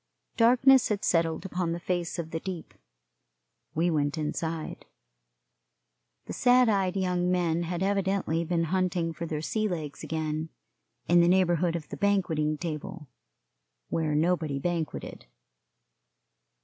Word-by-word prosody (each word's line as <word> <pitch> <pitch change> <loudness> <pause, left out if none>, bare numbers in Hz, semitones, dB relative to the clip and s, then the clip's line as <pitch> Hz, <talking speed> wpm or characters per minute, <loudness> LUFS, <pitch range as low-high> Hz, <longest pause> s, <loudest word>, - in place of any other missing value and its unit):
Darkness 255 +3 +5
had 210 -2 -1
settled 165 +1 +1
upon 180 -2 -2
the 170 - -4
face 175 -1 -2
of 165 -2 -5
the 165 - -2
deep. 180 -2 -7 1.0
We 170 +3 +2
went 145 0 0
inside. 160 +1 -4 1.4
The - - -6
sad 250 0 +4
eyed 195 -2 +1
young 180 -1 0
men 170 -2 +1
had 175 +1 -2
evidently 195 -4 0
been 170 0 0
hunting 180 -3 0
for 170 +1 -5
their 155 -1 -3
sea 215 +5 0
legs 155 -7 -5
again, 155 0 -3 0.6
in 175 0 +5
the 170 - +4
neighborhood 175 -2 +3
of 155 -3 -5
the - - -6
banqueting 165 -7 +1
table, 165 -1 -6 0.8
where 155 -2 0
nobody 160 -2 +1
banqueted. 165 - -4
170 Hz, 130 wpm, -28 LUFS, 160-185 Hz, 1.4 s, Darkness